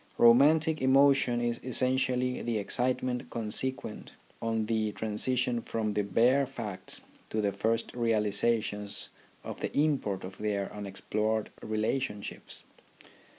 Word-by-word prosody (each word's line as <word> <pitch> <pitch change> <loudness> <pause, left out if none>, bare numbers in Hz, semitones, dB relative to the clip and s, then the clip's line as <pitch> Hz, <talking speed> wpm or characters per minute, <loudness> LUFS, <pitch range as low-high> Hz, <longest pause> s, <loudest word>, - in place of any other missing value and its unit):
Romantic 150 +7 +5
emotion 135 -2 +4
is 120 0 -1
essentially 125 0 0
the 115 -2 -1
excitement 125 +3 0
consequent 115 +1 -2 0.3
on 115 -1 0
the 110 -1 0
transition 120 +3 0
from 110 -2 -2
the 105 - +1
bare 120 +7 +3
facts 115 -8 -5 0.3
to 110 - -2
the 100 -1 +1
first 115 +4 -1
realizations 105 -2 0 0.3
of - - -7
the - - -3
import 140 -10 +1
of 95 +1 -9
their 100 -2 -2
unexplored 105 +2 -2
relationships. 110 0 -3
115 Hz, 110 wpm, -30 LUFS, 105-130 Hz, 0.3 s, Romantic